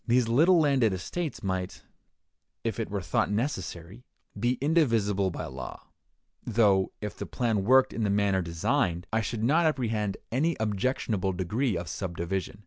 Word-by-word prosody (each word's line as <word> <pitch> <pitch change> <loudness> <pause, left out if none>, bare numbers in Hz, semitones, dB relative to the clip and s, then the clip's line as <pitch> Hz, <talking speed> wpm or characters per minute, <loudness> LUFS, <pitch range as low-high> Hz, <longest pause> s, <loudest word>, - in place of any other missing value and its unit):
These 120 0 +3
little 165 +10 +5
landed 135 -9 +3
estates 155 - -4
might, 95 -1 -3 0.8
if - - -2
it - - -2
were - - -3
thought - - +1
necessary, 105 - -3 0.3
be 120 +5 +1
indivisible 115 - +2
by - - -5
law; 65 -1 -8 0.5
though, 100 -4 +3
if 105 -1 -5
the - - -6
plan 115 -6 0
worked 130 +3 +5
in 115 - -2
the 105 - +1
manner 100 -1 +2
designed, 85 +1 0
I 110 - +3
should 110 0 -3
not 160 +7 +4
apprehend 110 -8 -1
any 155 +8 +1
objectionable 105 -2 -1
degree 105 +5 -1
of 85 -1 -5
subdivision. 90 +3 -4
105 Hz, 150 wpm, -28 LUFS, 95-125 Hz, 0.8 s, little